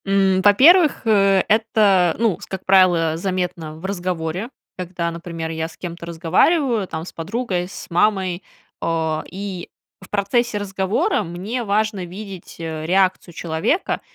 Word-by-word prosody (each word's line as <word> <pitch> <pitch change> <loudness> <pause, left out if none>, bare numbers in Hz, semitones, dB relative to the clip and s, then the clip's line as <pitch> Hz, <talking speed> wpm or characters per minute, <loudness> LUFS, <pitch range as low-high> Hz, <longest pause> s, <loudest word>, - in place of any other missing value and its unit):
М, 195 -1 +2
во-первых, 300 - +6
э, 195 -3 +4
это, 210 -5 +3
ну, 225 -5 +1
с - - -9
как 190 -1 -7
правило, 175 -4 +4
заметно 180 -4 -3
в 160 +4 -10
разговоре, 180 +1 -3 0.3
когда, 175 -2 -3
например, 165 -1 -6
я 160 0 -3
с 165 - -16
кем-то 170 -1 -7
разговариваю, 205 - +2
там, 160 -1 -5
с - - -10
подругой, 180 0 -3
с 195 - -9
мамой, 185 0 +1 0.4
о. 160 -1 -1
И 190 -2 -6 0.3
в 190 - -14
процессе 210 +3 0
разговора 195 0 0
мне 195 +9 -4
важно 210 -1 0
видеть 190 +1 -9
реакцию 170 +2 0
человека, 170 - -1
185 Hz, 135 wpm, -21 LUFS, 170-205 Hz, 0.4 s, во-первых